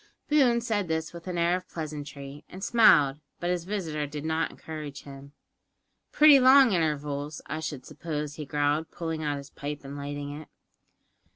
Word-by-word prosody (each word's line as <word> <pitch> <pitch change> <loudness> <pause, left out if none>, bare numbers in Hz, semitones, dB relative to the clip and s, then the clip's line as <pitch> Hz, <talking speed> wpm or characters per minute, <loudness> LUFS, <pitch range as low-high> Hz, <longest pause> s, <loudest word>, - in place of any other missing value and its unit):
Boone 265 -6 +4
said 215 -5 -1
this 160 0 -2
with 170 +1 -10
an 180 -1 -3
air 170 +1 +3
of 185 0 -6
pleasantry, 145 -2 -7
and 190 +1 -9
smiled, 150 - +5 0.2
but 175 +1 -1
his 175 -2 -2
visitor 165 -7 -3
did 150 +1 -6
not 160 +1 0
encourage 150 -3 -8
him. 140 0 -11 0.8
"Pretty 300 -2 +7
long 260 -1 +7
intervals, 150 -2 -1
I 155 - -4
should 155 -4 -5
suppose," 150 -3 -5
he 150 0 -7
growled, 145 +2 0
pulling 165 -2 -4
out 145 -2 -1
his 140 0 -10
pipe 145 0 -6
and 140 +1 -8
lighting 145 0 -5
it. 155 - -14
155 Hz, 170 wpm, -27 LUFS, 145-175 Hz, 0.8 s, Pretty